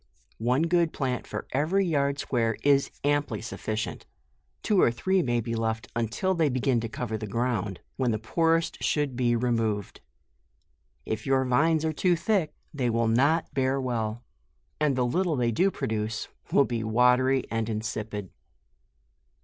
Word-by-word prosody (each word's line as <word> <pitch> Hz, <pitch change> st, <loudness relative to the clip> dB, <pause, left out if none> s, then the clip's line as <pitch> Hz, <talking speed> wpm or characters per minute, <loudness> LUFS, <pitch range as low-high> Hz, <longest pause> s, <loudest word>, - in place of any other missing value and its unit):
One 125 Hz, +6 st, +2 dB
good 170 Hz, -1 st, +2 dB
plant 130 Hz, -3 st, -2 dB
for -, -, -5 dB
every 165 Hz, +9 st, +1 dB
yard 140 Hz, -4 st, +1 dB
square, 115 Hz, -5 st, 0 dB
is 140 Hz, -1 st, +4 dB
amply 145 Hz, -6 st, +1 dB
sufficient, 110 Hz, -1 st, -4 dB, 0.6 s
two 205 Hz, -4 st, +3 dB
or -, -, +5 dB
three 185 Hz, +11 st, +1 dB
may 120 Hz, -6 st, 0 dB
be 115 Hz, +1 st, -4 dB
left 110 Hz, -1 st, -2 dB
until 115 Hz, -, 0 dB
they 165 Hz, -4 st, +2 dB
begin 130 Hz, -1 st, +1 dB
to 115 Hz, 0 st, -4 dB
cover 110 Hz, -1 st, -4 dB
the 110 Hz, -, -5 dB
ground, 105 Hz, -3 st, -2 dB, 0.2 s
when 130 Hz, -2 st, +1 dB
the 110 Hz, -, +1 dB
poorest 165 Hz, +8 st, 0 dB
should 145 Hz, -4 st, 0 dB
be 120 Hz, -1 st, +2 dB
removed. 115 Hz, -4 st, -1 dB, 1.0 s
If 110 Hz, +2 st, -4 dB
your 135 Hz, -1 st, +3 dB
vines 155 Hz, +5 st, +2 dB
are 160 Hz, -, 0 dB
too 180 Hz, +3 st, +2 dB
thick, 170 Hz, -2 st, 0 dB, 0.2 s
they 130 Hz, -5 st, 0 dB
will 115 Hz, 0 st, +1 dB
not 140 Hz, +8 st, +2 dB
bear 135 Hz, 0 st, +1 dB
well, 120 Hz, -3 st, -2 dB, 0.6 s
and 150 Hz, -3 st, +2 dB
the 125 Hz, -1 st, +1 dB
little 170 Hz, +6 st, +1 dB
they 120 Hz, -3 st, +1 dB
do 185 Hz, -, +3 dB
produce, 110 Hz, -, -3 dB, 0.2 s
will 140 Hz, -, +5 dB
be 115 Hz, -2 st, -2 dB
watery 125 Hz, +4 st, +3 dB
and 115 Hz, 0 st, -1 dB
insipid. 110 Hz, -2 st, -4 dB
125 Hz, 155 wpm, -27 LUFS, 115-150 Hz, 1.0 s, or